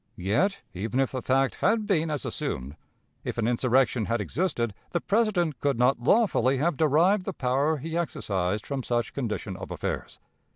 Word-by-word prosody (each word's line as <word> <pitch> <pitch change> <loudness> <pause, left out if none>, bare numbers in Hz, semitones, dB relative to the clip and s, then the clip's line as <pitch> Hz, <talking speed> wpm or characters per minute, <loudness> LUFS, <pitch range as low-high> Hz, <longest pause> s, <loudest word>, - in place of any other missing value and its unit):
Yet, 115 - 0
even 110 +7 -2
if 135 - +1
the 130 - -3
fact 135 +1 +1
had 220 0 +2
been 165 -6 +1
as 150 -5 -3
assumed, 65 +4 -4 0.5
if - - -4
an 115 -1 +1
insurrection 125 -1 +2
had 115 +2 0
existed, 120 - -1 0.2
the 175 - +2
President 195 - +1
could 140 -4 0
not 125 +1 +3
lawfully 135 - +3
have 155 +4 +1
derived 165 +7 +3
the 195 - -3
power 140 +4 +1
he 160 +4 -5
exercised 100 - -1
from 140 -2 -3
such 120 -2 -1
condition 110 -6 -3
of 95 - -8
affairs. - - -4
135 Hz, 170 wpm, -27 LUFS, 115-170 Hz, 0.5 s, not